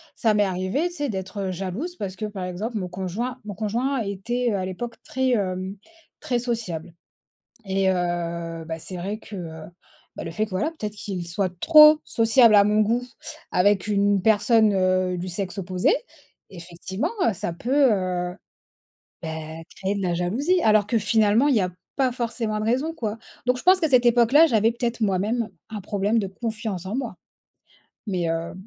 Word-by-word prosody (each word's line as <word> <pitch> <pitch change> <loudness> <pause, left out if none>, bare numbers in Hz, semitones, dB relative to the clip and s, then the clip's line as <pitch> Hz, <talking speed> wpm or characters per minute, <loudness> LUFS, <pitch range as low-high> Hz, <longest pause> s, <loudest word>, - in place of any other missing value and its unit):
Ça 220 -2 +2
m'est 210 0 +3
arrivée, 185 - -1
tu 350 - -12
sais, 290 -4 -2
d'être 190 -1 -4
jalouse, 195 - -4
parce 190 -2 -5
que, 215 - -4
par 200 -3 -5
exemple, 210 +6 -4
mon 185 -3 -3
conjoint 195 +8 -4
mon 210 - -5
conjoint 235 +6 -1
était, 230 +5 -2
heu, - - 0
à 185 - -2
l'époque 230 +6 -5
très 260 0 -1
hem, 190 -2 -1 0.4
très 245 -2 0
sociable 220 -9 -4 0.8
et 190 0 +2
heu, 170 -2 -2
bah 160 0 -4
c'est 180 +3 -8
vrai 195 +5 -4
que 215 - -12
heu, 160 -3 -7 0.5
bah, - - -5
le 165 - -5
fait 215 +6 0
que - - -17
voilà, 195 +12 -1
peut-être 215 -10 -5
qu'il 190 -4 -5
soit 185 +2 -1
trop 305 -1 +8
sociable 230 0 +4
à 200 - +8
mon 210 +1 +3
goût 230 +3 +2 0.5
avec 195 +2 +3
une 200 -1 +2
personne, 220 0 +4
heu, 185 -1 +1
du 180 - -4
sexe 185 +2 -4
opposé. 185 -1 +1 0.6
Effectivement, 175 +2 -5 0.2
heu, - - +2
ça 170 - -4
peut, 240 +11 -2 0.2
heu, 180 -2 -2 0.9
bah, 165 - -4 0.5
créer 195 +1 -2
de 200 - -3
la 180 -2 0
jalousie. 250 - +1
Alors 215 -2 +4
que 230 +2 +1
finalement, 220 +4 +3
il 280 - +3
y - - +4
a 180 -1 0 0.3
pas 260 -3 +2
forcément 230 -3 -2
de - - -2
raison, 260 +8 0
quoi. 225 -6 -4 0.3
Donc, 250 0 +3
je - - -8
pense 370 +1 +5
qu'à 320 - +2
cette 250 -2 +5
époque-là, 240 +6 +6
j'avais 225 -5 +2
peut-être 240 0 -3
moi-même 210 +3 0 0.2
un 215 -1 -5
problème 205 +3 0
de 200 - 0
confiance 215 -2 -4
en 195 - -4
moi. 245 -8 -4 0.9
Mais 180 -4 -1
heu, 165 0 -3
205 Hz, 185 wpm, -24 LUFS, 185-235 Hz, 0.9 s, trop